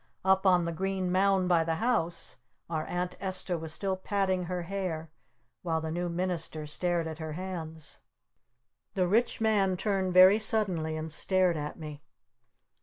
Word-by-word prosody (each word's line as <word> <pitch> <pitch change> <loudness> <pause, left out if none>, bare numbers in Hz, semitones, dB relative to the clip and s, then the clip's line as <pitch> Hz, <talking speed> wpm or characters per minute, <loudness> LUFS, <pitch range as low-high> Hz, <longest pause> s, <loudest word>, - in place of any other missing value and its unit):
Up 190 0 +4
on 180 -2 +4
the 170 - -1
green 190 +1 -2
mound 190 0 +3
by 170 -2 +4
the 165 0 -1
house 175 -4 -1 0.4
our 155 -1 -2
Aunt 180 0 -2
Esta 185 -1 -1
was 160 -1 -5
still 190 +3 -1
patting 190 -1 0
her 180 0 -3
hair 170 -4 -4 0.5
while 165 -2 0
the 160 0 -4
New 175 +1 -2
Minister 170 -3 -3
stared 170 +2 -1
at 160 0 -6
her 160 -1 -5
hands. 160 -3 -7 1.0
The 185 -2 +2
Rich 225 +5 +1
Man 200 -4 +2
turned 195 -2 0
very 185 +3 +8
suddenly 185 -8 0
and 155 0 -5
stared 185 +1 +2
at 150 -1 -4
me. 150 -2 -8
180 Hz, 160 wpm, -29 LUFS, 160-190 Hz, 1.0 s, very